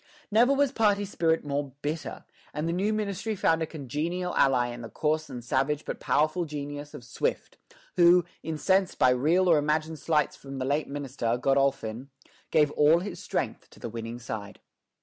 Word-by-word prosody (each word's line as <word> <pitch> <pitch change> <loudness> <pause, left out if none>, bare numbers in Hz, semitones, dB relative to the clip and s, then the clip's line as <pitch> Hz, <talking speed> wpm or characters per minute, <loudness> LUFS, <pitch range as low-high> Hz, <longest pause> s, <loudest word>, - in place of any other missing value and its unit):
Never 235 +5 +5
was 280 -1 +3
party 205 -5 +2
spirit 165 -5 0
more 140 -1 -2
bitter; 150 +2 -4 0.3
and 150 +2 -2
the 165 - 0
new 195 +4 0
ministry 215 0 -2
found 165 -3 +2
a 160 - -1
congenial 165 +5 -3
ally 125 -3 +3
in 120 0 -7
the 115 - -7
coarse 155 0 -1
and 125 -3 -7
savage 135 +4 0
but - - -5
powerful 155 +4 +1
genius 145 -1 -6
of - - -9
Swift, - - -3 0.4
who, 175 0 +6 0.2
incensed 185 +4 +1
by 130 - +5
real 160 +9 +3
or 165 -4 +5
imagined 155 +1 -1
slights 150 -1 +1
from 135 -1 -9
the 130 - -2
late 145 +3 0
minister, 135 -4 -2
Godolphin, 135 -2 0 0.4
gave 150 -2 +3
all 150 +3 +4
his 200 +2 -6
strength - - -3
to - - -18
the - - -5
winning 115 +1 -6
side. 105 -4 -7
150 Hz, 175 wpm, -27 LUFS, 135-175 Hz, 0.4 s, who